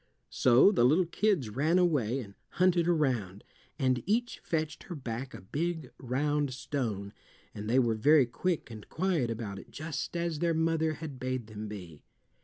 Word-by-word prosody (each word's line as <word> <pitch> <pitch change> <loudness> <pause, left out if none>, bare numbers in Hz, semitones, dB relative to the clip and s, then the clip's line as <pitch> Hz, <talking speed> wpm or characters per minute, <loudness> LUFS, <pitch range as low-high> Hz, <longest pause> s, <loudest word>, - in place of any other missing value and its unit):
So 130 +10 +6
the 175 - +3
little 155 +9 +4
kids 175 - 0
ran 155 - +2
away, 135 -9 +2
and 100 -4 -10 0.2
hunted 180 -2 +3
around, 125 - 0 0.3
and 130 -3 +1
each 240 +4 0
fetched 155 -2 -2
her 175 - -6
back 130 -1 -5
a - - -9
big 155 - -3
round 145 +2 0
stone, 110 -8 -3 0.4
and 105 +1 -6
they 125 - +3
were 120 -3 +3
very 140 +6 +5
quick 155 +4 -2
and 110 -2 -10
quiet 165 -8 0
about 110 -4 -4
it, - - -13
just 155 +2 -4
as 170 -3 -2
their 170 0 +1
mother 160 -1 +1
had 150 -4 -7
bade 130 -2 -2
them 110 0 -7
be. 90 -8 -9
135 Hz, 170 wpm, -30 LUFS, 115-165 Hz, 0.4 s, So